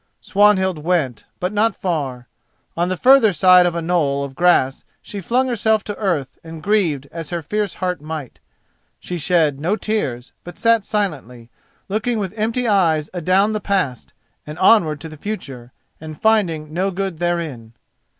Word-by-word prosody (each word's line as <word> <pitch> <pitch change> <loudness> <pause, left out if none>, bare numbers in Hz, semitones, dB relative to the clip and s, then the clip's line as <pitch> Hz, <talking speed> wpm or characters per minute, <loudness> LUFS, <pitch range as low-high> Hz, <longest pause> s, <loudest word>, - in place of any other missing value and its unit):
Swanhild 190 -4 +2
went, 150 -7 -1
but 180 +3 -2
not 220 +2 +2
far. 140 - -3 0.5
On 175 +1 0
the 185 - -2
further 255 -2 +6
side 180 +1 +6
of 170 - -2
a 170 - -2
knoll 150 -5 0
of 140 -1 -6
grass 135 -5 +2 0.2
she 200 - -8
flung 250 +8 +1
herself 220 -3 +1
to 205 - -6
earth 165 -11 -2
and 160 -1 -10
grieved 170 -10 +1
as 165 -2 -6
her 170 -2 -4
fierce 210 +5 -2
heart 180 -4 -3
might. 155 -4 -7 0.6
She 175 -1 -5
shed 155 -4 +2
no 175 +8 0
tears, 165 - -3
but 175 -1 -10
sat 230 -2 +3
silently, 130 - -3 0.4
looking 220 +4 -1
with 195 -3 -3
empty 230 +3 -1
eyes 165 -7 +2
adown 185 +4 +2
the 215 - -2
past, 185 - -2 0.3
and 150 +1 -7
onward 175 -6 +4
to 160 - -7
the 155 -1 -11
future, 135 - -7 0.3
and 155 -1 -9
finding 170 -9 +1
no 185 +3 0
good 190 -3 -4
therein. 160 -10 -3
175 Hz, 165 wpm, -20 LUFS, 150-205 Hz, 0.6 s, further